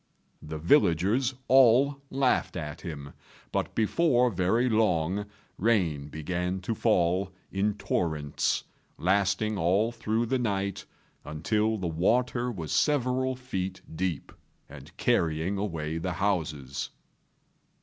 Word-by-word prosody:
The 80 +1 -6
villagers 100 - +3
all 135 +2 +5
laughed 130 -7 +1
at 75 -1 -6
him; 70 -5 -7 0.4
but - - -2
before 125 +1 +3
very 95 +7 +1
long 100 -3 +1 0.3
rain 90 -10 +1
began 90 +5 -3
to 95 - -2
fall 95 -3 +1 0.2
in 100 +1 0
torrents, 80 -7 -1 0.3
lasting 100 +3 +1
all 95 +7 +2
through 115 0 -1
the 130 +3 0
night, 100 -4 -2 0.4
until 105 +8 0
the 95 - -4
water 120 +9 +1
was 80 -9 -6
several 130 -2 +1
feet 95 -7 -4
deep, 90 -4 -2 0.4
and - - -12
carrying 85 +4 +1
away 80 -5 -3
the 90 +2 -2
houses. 80 -8 -2
95 Hz, 110 wpm, -28 LUFS, 85-115 Hz, 0.4 s, all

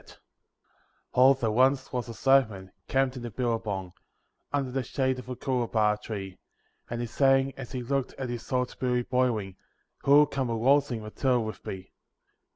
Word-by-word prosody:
there 130 -3 +5
once 130 +4 +2
was 125 -1 -2
a - - -4
swagman 110 -10 +2 0.2
camped 135 -1 +1
in 120 - -7
a - - -5
Billabong, 105 -6 -2 0.6
Under 140 -3 -1
the 135 +1 -1
shade 130 +1 -1
of 125 - -10
a 125 - -3
Coolabah 115 -5 0
tree; 95 -4 -6 0.5
And 120 0 -3
he - - -1
sang 135 +2 +2
as 135 -2 -8
he 125 -1 -3
looked 135 +1 -1
at 130 - -4
his 120 +1 -6
old 125 -1 0
billy 125 -1 +1
boiling, 115 -7 0 0.4
'Who'll 145 +2 +6
come 135 -3 -2
a 115 - -1
waltzing 130 -1 +2
Matilda 125 +3 0
with 110 -1 -6
me?' 95 -1 -7
125 Hz, 165 wpm, -28 LUFS, 110-135 Hz, 0.6 s, Who'll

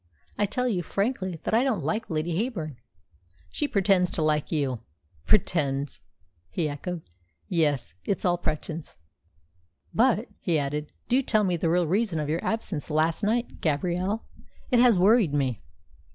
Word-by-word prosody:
"I 205 - +1
tell 250 +5 0
you 195 -7 0
frankly 190 -1 -2
that - - -2
I 230 +3 +5
don't 265 - 0
like 220 +1 -1
Lady 160 +1 -1
Heyburn." 170 - -2 0.7
"She 295 - -1
pretends 195 -6 +3
to 160 - -1
like 150 -1 +1
you." 140 -6 0 0.5
"Pretends!" 145 -9 +1 0.5
he 155 - -1
echoed. 160 +3 -5 0.4
"Yes, 150 -8 +1
it's 195 - -1
all 175 -1 +2
pretence. 155 - -4 1.0
But," 235 -1 +3
he 170 -4 +1
added, 150 +1 -2 0.2
"do 255 +3 +3
tell 215 -5 +2
me 180 -3 +1
the 165 0 0
real 175 +1 +3
reason 190 0 +1
of 150 -1 -2
your 160 +2 -1
absence 200 -10 -2
last 160 +3 +1
night, 230 +3 -1
Gabrielle. 180 +7 0 0.5
It 245 - +5
has 240 -4 +6
worried 195 -4 +4
me." 130 -6 0
175 Hz, 150 wpm, -27 LUFS, 155-215 Hz, 1.0 s, has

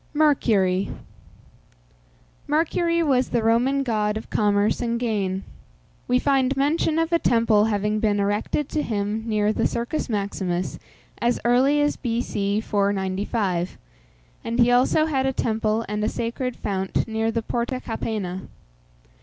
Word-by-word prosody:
MERCURY. 210 -11 +2 1.6
Mercury 335 +2 +1
was 260 -4 +2
the 235 -2 0
Roman 250 +5 +2
god 215 -3 0
of 220 - -9
commerce 205 +1 +2
and 235 -1 -1
gain. 200 -5 -1 0.6
We 250 - +3
find 270 0 +1
mention 310 +3 +1
of 330 +1 0
a 335 - +4
temple 230 -5 +3
having 210 0 0
been 210 -1 +1
erected 205 +8 0
to 305 - -1
him 210 -2 -2
near 215 -1 +1
the 225 - +1
Circus 240 +5 -3
Maximus 195 -4 -2 0.4
as 240 +1 +1
early 260 +5 +4
as 290 0 +1
B.C. 215 -4 -1
495; 195 -2 -1 0.7
and 230 +1 -3
he 240 -1 +5
had 245 - +5
also 265 +5 +3
a 270 -4 0
temple 220 -1 0
and 210 0 -2
a 215 - +1
sacred 240 +2 -3
fount 190 0 -2
near 225 0 -1
the 225 0 -1
Porta 240 +3 -2
Capena. 210 -6 -4
225 Hz, 135 wpm, -23 LUFS, 205-255 Hz, 1.6 s, he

